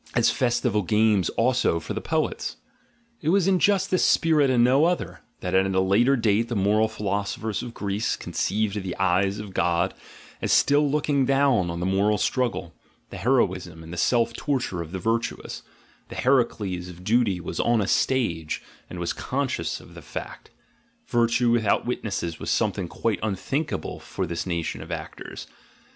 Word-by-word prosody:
as - - +4
festival 120 -3 +1
games 105 -1 +2
also 120 -8 +2
for - - -6
the - - -3
poets. - - -2 0.6
It 155 - 0
was 190 +1 +3
in 190 -2 +3
just 200 0 +2
this 185 - +3
spirit 155 -4 +4
and 120 -2 +4
no 135 +5 +5
other, 175 +1 -1 0.2
that - - -3
at 95 +1 +4
a - - +4
later 105 +8 +4
date 115 -1 +2
the 120 - -3
moral 105 +2 +3
philosophers 105 0 -3
of 120 - -8
Greece 100 +2 -1
conceived 105 0 -1
the 95 -2 -5
eyes 95 +2 +2
of 105 -3 -7
God 90 +2 +1 0.5
as - - -1
still 145 +1 +4
looking 140 -2 +1
down 135 -9 +3
on 85 0 -4
the 90 - -2
moral 100 +3 +2
struggle, 95 -8 -1 0.4
the - - -6
heroism, 95 -10 0
and 80 +1 -9
the - - -4
self 115 +6 +2
torture 125 - -2
of 80 -1 -7
the 95 - -3
virtuous; 115 +5 -2 0.5
the - - -8
Heracles 105 -9 +1
of 90 0 -11
duty 110 -3 +2
was 85 - -5
on 120 -1 +3
a 100 - +1
stage, 85 -12 0 0.3
and 90 - -7
was 85 -1 -2
conscious 130 - -2
of - - -15
the - - -10
fact; - - -8 0.6
virtue 120 0 +2
without 115 -3 +2
witnesses 100 -8 -3
was - - -4
something 95 - 0
quite 105 +3 -1
unthinkable 120 - -2
for 95 - -4
this 85 +2 -4
nation 85 -3 -2
of - - -9
actors. - - -7
105 Hz, 170 wpm, -25 LUFS, 95-125 Hz, 0.6 s, no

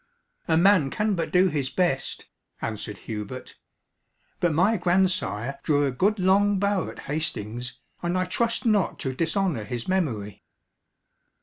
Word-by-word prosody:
"A 160 - +3
man 180 -5 +5
can 210 +7 0
but 170 -3 -1
do 185 +1 +5
his 145 -5 -1
best," 175 -8 -1 0.3
answered 105 -2 -4
Hubert; 110 +3 -6 0.8
"but 175 - +2
my 180 +9 +3
grandsire 175 - 0
drew 145 -1 +2
a 135 - 0
good 200 - +1
long 200 +2 +3
bow 200 -2 0
at - - -9
Hastings, 125 -5 -4 0.2
and 175 +1 0
I 185 - +1
trust 230 +7 -1
not 210 -5 +2
to 130 - -2
dishonour 165 - 0
his 120 +1 -5
memory." 120 - -1
170 Hz, 140 wpm, -25 LUFS, 130-190 Hz, 0.8 s, man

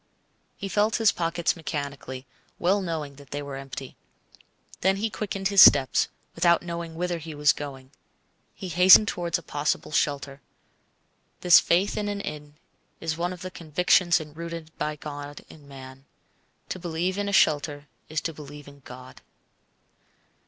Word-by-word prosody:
He 200 - -5
felt 210 +3 +1
his 225 -3 +4
pockets 170 0 -1
mechanically, 140 -5 -6 0.3
well 195 +4 +2
knowing 155 -6 -4
that 140 -2 -15
they 145 0 -4
were 140 -1 -7
empty. 135 -1 -8 0.8
Then 190 +1 +2
he 215 +2 -2
quickened 195 -1 -3
his 200 -1 +6
steps, 135 -2 +6 0.3
without 170 0 +3
knowing 170 -1 -6
whither 175 0 -2
he 160 -1 -8
was 150 +1 +4
going. 135 -2 -8 0.6
He 185 - -7
hastened 180 +5 +7
towards 170 -3 -1
a 170 - -12
possible 145 +1 -2
shelter. 140 -2 -1 1.0
This 180 -1 +8
faith 185 +4 +1
in 210 - -2
an 205 0 -3
inn 150 -5 -7 0.4
is 165 -1 -3
one 175 +2 -2
of 180 -1 -8
the 185 - -6
convictions 175 +2 +2
enrooted 160 +1 -8
by 150 0 -2
God 145 -1 -8
in 145 -2 -15
man. 135 -1 -12 0.6
To 185 - -4
believe 175 +2 -2
in 200 0 -1
a - - -2
shelter 145 -5 +2 0.2
is 155 0 -2
to 165 - -4
believe 145 -1 -11
in 140 0 -14
God. 130 -1 -13
160 Hz, 155 wpm, -26 LUFS, 145-180 Hz, 1.0 s, This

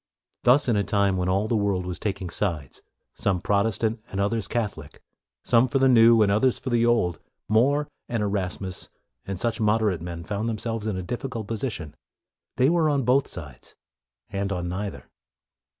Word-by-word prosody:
Thus 130 +4 +4
in 120 - +3
a 100 - +2
time 100 0 +1
when 90 0 -1
all 100 +3 +1
the 115 - 0
world 100 -3 0
was 90 -1 -4
taking 95 -4 -3
sides, 85 -9 -3 0.3
some 95 -3 0
Protestant 110 +3 0
and 95 - -4
others 105 +2 0
Catholic, 105 - -4 0.4
some 120 +1 +4
for 135 - 0
the 135 0 +4
new 115 -2 +6
and 100 - +2
others 115 +5 +2
for 130 - -5
the 120 -1 +3
old, 100 -8 +1 0.3
More 135 +8 +3 0.2
and 115 -3 -1
Erasmus 95 -2 -3 0.4
and 95 -2 -4
such 115 +1 -1
moderate 105 -5 +2
men 85 0 -6
found 105 +4 -2
themselves 115 0 -3
in 105 -4 -1
a 95 - -4
diffi 120 +8 -4
cult 115 -4 -5
position. 105 - -4 0.6
They 130 +1 +4
were 165 0 +3
on 140 -2 +1
both 130 +3 +3
sides, 70 -8 -10 0.6
and 100 0 -2
on 90 -2 -2
neither. 95 +2 -5
105 Hz, 180 wpm, -25 LUFS, 95-115 Hz, 0.6 s, new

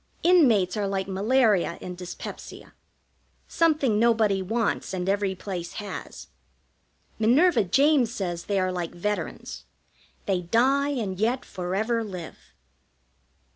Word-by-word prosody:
Inmates 245 - +4
are 205 -2 -1
like 195 -1 -2
malaria 205 -2 +2
and 180 - -7
dyspepsia: 175 0 -9 0.7
something 300 -10 +2
nobody 220 -4 +3
wants 210 -1 -1
and 180 0 -3
every 200 -1 0
place 180 -2 -6
has. 210 -1 -7 0.9
Minerva 260 - +4
James 270 - +3
says 175 -7 -4
they 200 - -1
are 185 0 0
like 175 -1 -4
veterans 210 +4 -4 0.6
they 190 -3 0
die 260 +10 +2
and 210 -10 -3
yet 240 +4 0
forever 210 +6 -2
live. 180 -6 -8
205 Hz, 115 wpm, -25 LUFS, 185-240 Hz, 0.9 s, Inmates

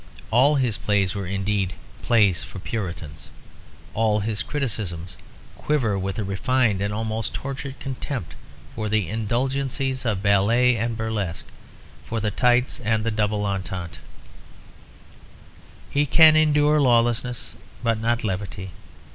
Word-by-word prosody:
All 135 +6 +5
his 125 -6 0
plays 100 -3 +1
were 100 -2 -4
indeed 95 0 -1 0.3
"plays 100 - +3
for 85 - -9
Puritans." 85 - -5 0.6
All 110 -1 +2
his 105 0 -2
criticisms 105 - -4 0.4
quiver 130 -9 +1
with 95 0 -3
a 110 - -1
refined 100 +1 +1
and 100 +1 -1
almost 110 +1 -2
tortured 135 0 -5
contempt 130 - -5 0.4
for 110 -1 -3
the 105 -4 +1
indulgencies 130 - -1
of 105 -5 -1
ballet 115 +5 +4
and 115 0 -2
burlesque, 105 -6 -3 0.6
for 115 - -3
the 105 -1 -1
tights 125 +3 +2
and 110 -2 0
the 115 - 0
double 105 -1 0
entente. 95 -3 -4 1.9
He 145 +1 +2
can 155 +2 +7
endure 150 -1 +4
lawlessness 120 -1 +1 0.3
but 115 -2 +1
not 120 +1 0
levity. 95 -2 -4
110 Hz, 125 wpm, -24 LUFS, 100-125 Hz, 1.9 s, can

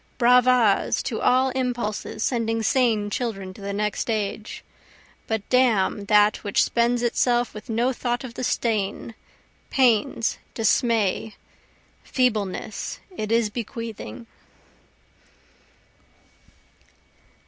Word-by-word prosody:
(Bravas 250 -3 +4
to 225 - -3
all 260 +1 +3
impulses 245 -4 -3
sending 225 -2 0
sane 220 -3 +1
children 195 -6 -3
to 200 - -14
the 200 0 -4
next 210 +2 -2
age! 215 0 -3 0.6
But 220 -2 -2
damn 220 -6 +2
that 210 +1 +4
which 205 -2 +1
spends 240 +1 +1
itself 240 0 +1
with 210 +3 -10
no 235 +4 +1
thought 240 0 -2
of 250 -3 -8
the 255 - -6
stain, 225 -2 -1 0.6
pains, 230 -3 +2 0.2
dismay, 220 -2 +1 0.7
feebleness, 215 -4 -2 0.2
it 215 -6 -4
is 230 -2 +2
bequeathing.) 225 - -6
225 Hz, 100 wpm, -24 LUFS, 210-245 Hz, 0.7 s, Bravas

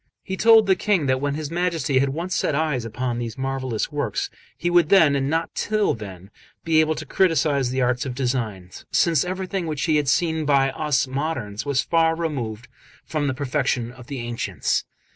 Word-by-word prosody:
He 190 - -4
told 225 +1 +6
the 190 -1 +4
King 195 -8 +1
that 130 0 +1
when 145 0 -1
his 155 0 -5
Majesty 165 -5 0
had 135 +1 +2
once 170 +6 -3
set 150 - 0
eyes 150 -6 0
upon 120 +2 -3
those 120 +1 -5
marvellous 130 -2 -2
works, 400 - -2 0.3
he - - -3
would 175 -2 +4
then, 160 -8 +6
and 135 0 0
not 165 +2 -1
till 215 -1 +1
then, 95 -3 -9 0.3
be 160 -1 +3
able 155 0 +2
to - - -6
criticise 150 -7 +2
the 130 0 0
arts 125 0 +1
of 130 -3 -5
design, 115 -8 -2 0.2
since 165 -5 +3
everything 185 0 -3
which 150 -3 -3
he 155 -2 +2
had 145 -2 0
seen 160 +3 +1
by 140 -2 +3
us 150 -4 0
moderns 135 -5 -3
was 140 -1 +1
far 165 -1 +2
removed 120 -9 -4 0.4
from 150 -2 -1
the 130 - -1
perfection 130 -3 -1
of 125 -1 -14
the 140 - -5
ancients. 120 0 -2
145 Hz, 195 wpm, -23 LUFS, 130-165 Hz, 0.4 s, told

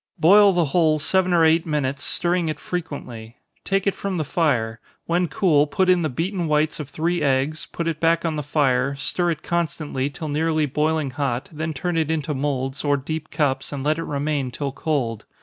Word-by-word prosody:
Boil 200 +4 +7
the 175 -3 +2
whole 155 +1 +2
seven 185 +4 +1
or 170 -2 +5
eight 160 +1 +4
minutes, 140 -4 -2
stirring 175 -1 0
it 155 - -4
frequently. 125 -10 -6 0.3
Take 195 0 0
it 200 - +2
from 195 -2 -3
the 155 - 0
fire 125 -8 0 0.3
when 175 +1 +1
cool, 155 -6 +3
put 190 +4 +1
in 180 -1 +3
the 155 - 0
beaten 175 +6 -2
whites 150 0 +1
of 145 -3 -6
three 165 +4 -1
eggs, 140 +2 0
put 170 - -3
it 160 -2 -2
back 165 +1 +2
on 160 -2 0
the 150 - -2
fire, 140 -2 +1
stir 175 +5 -1
it 160 -3 -3
constantly 155 -5 -2
till 155 +3 -6
nearly 155 +1 +1
boiling 150 0 0
hot, 130 -2 -2
then 160 +1 -3
turn 170 +4 -2
it 160 -1 +1
into 155 -1 -1
moulds, 135 -1 -2
or 145 -1 +2
deep 155 +3 -5
cups, 135 -3 -1
and 140 -2 -4
let 155 +2 +1
it - - -2
remain 145 -2 -1
till 140 +2 -3
cold. 130 -7 -2
155 Hz, 200 wpm, -23 LUFS, 140-165 Hz, 0.3 s, Boil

